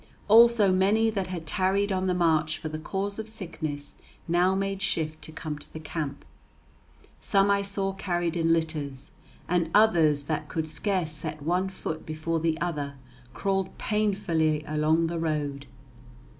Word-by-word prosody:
Also 225 -2 +7
many 205 +4 +3
that 195 -3 -2
had 175 -3 -5
tarried 195 +4 +1
on 190 0 0
the 180 - +1
march 160 -3 +2
for 155 - -5
the 155 0 -5
cause 200 +5 -3
of 220 0 -5
sickness 155 -8 -5 0.3
now 175 +3 +3
made 195 0 -2
shift 155 -5 -1
to 160 - -7
come 155 -1 -5
to - - -10
the 160 - -7
camp. 155 -2 -5 0.9
Some 200 0 +3
I 200 0 +3
saw 195 -1 -2
carried 175 -3 -1
in 165 -1 +2
litters, 150 -5 -2 0.4
and 170 -2 +1
others 165 -9 +5
that 150 0 -3
could 160 -1 -2
scarce 175 +1 -1
set 155 -1 -6
one 180 +4 +1
foot 160 -4 -5
before 155 +1 -2
the 160 0 0
other 150 -5 -3 0.4
crawled 195 -1 -1
painfully 180 -8 +1
along 155 +2 +2
the 165 0 -2
road. 145 -3 -2
170 Hz, 155 wpm, -27 LUFS, 155-195 Hz, 0.9 s, Also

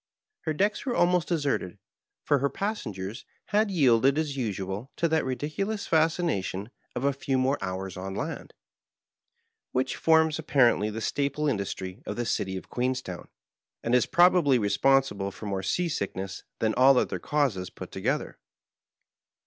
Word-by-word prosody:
Her 160 - 0
decks 205 +6 0
were 255 -3 -1
almost 175 -2 +3
deserted, 145 - -1 0.5
for 145 - +2
her 140 +2 +1
passengers 110 - -4 0.3
had 215 +1 +2
yielded 135 - +4
as 155 -3 -1
usual 105 -1 -3
to 170 - +1
that 160 0 +1
ridiculous 155 - -3
fascination 155 - 0 0.2
of 125 - -3
a 140 0 +2
few 135 0 -1
more 130 +2 +1
hours 95 0 -4
on 95 +1 -5
land, - - -5 1.2
which 130 +1 0
forms 160 -1 +3
apparently 125 -8 +3
the 110 +1 -5
staple 140 +5 -1
industry 100 -3 -3
of - - -3
the 120 - -2
city 95 -4 -1
of - - -9
Queenstown, 125 -7 -3 0.6
and 115 - -1
is 125 - +4
probably 175 -6 +5
re 105 -3 0
sponsible 130 -3 +2
for 105 - -10
more 100 -2 -2
sea 175 - 0
sickness 95 - -4 0.2
than 110 -1 +1
all 130 +1 +6
other - - 0
causes 130 - 0
put - - -10
together. - - -2
130 Hz, 150 wpm, -27 LUFS, 100-155 Hz, 1.2 s, all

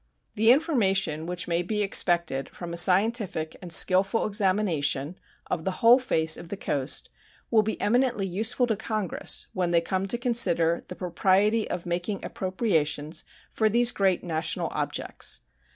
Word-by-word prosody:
The 220 +2 +4
information 195 - +1
which 180 0 -2
may 170 0 0
be 210 +4 -2
expected 170 -8 +1
from 175 -1 -8
a - - -4
scientific 185 -2 +2
and 180 -2 -9
skillful 190 +5 +3
examination 185 -7 0 0.3
of 160 - -3
the 190 +1 -3
whole 240 +3 +8
face 160 -11 +1
of 170 - -11
the 200 - -5
coast 140 -6 -3 0.4
will 225 -2 +5
be 215 +1 -4
eminently 240 -2 +1
useful 220 +7 0
to 225 -2 -1
Congress 215 -2 -3
when 180 -2 -1
they 170 -1 +3
come 190 +3 -2
to 240 - +1
consider 200 -9 +2
the - - -8
propriety 195 +5 +1
of 180 -1 -5
making 175 +3 -3
appropriations 160 -6 -2 0.3
for 220 -1 +1
these 240 +2 +4
great 190 -3 0
national 165 -1 -2
objects. - - -3
190 Hz, 150 wpm, -26 LUFS, 170-215 Hz, 0.4 s, whole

